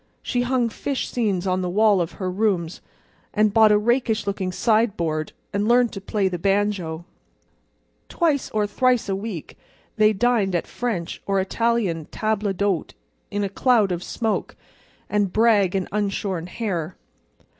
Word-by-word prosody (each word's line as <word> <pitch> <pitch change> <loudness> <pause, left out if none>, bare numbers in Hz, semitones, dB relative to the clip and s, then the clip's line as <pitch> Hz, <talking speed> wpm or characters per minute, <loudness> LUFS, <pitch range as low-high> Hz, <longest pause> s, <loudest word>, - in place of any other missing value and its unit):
She 245 - 0
hung 245 -1 +1
fish 270 +4 -3
seines 200 -7 0
on 185 0 0
the 180 - -2
walls 205 0 +4
of 170 - -2
her 185 -2 -3
rooms, 185 -4 -1 0.5
and 215 -1 +3
bought 220 -1 +6
a 210 - +5
rakish 230 0 +1
looking 195 -2 -2
sideboard, 180 -8 0 0.2
and 200 +1 0
learned 240 0 +4
to 195 - -6
play 200 0 0
the 180 -2 -3
banjo. 195 -4 0 1.0
Twice 310 -5 0
or 210 -1 0
thrice 245 +3 +1
a 195 - 0
week 195 -5 -6 0.4
they 215 0 +5
dined 215 -3 +1
at 170 - 0
French 215 -9 -4
or 195 -1 +2
Italian 195 -5 0
tables 210 0 -1
d'hôte 195 -2 -1 0.4
in 205 -1 -2
a - - 0
cloud 215 0 +2
of 175 0 -3
smoke, 225 -3 -2 0.5
and 205 -3 0
brag 210 -4 +3
and 190 -2 -1
unshorn 195 -4 -2
hair. 185 -5 -3
205 Hz, 155 wpm, -23 LUFS, 185-225 Hz, 1.0 s, bought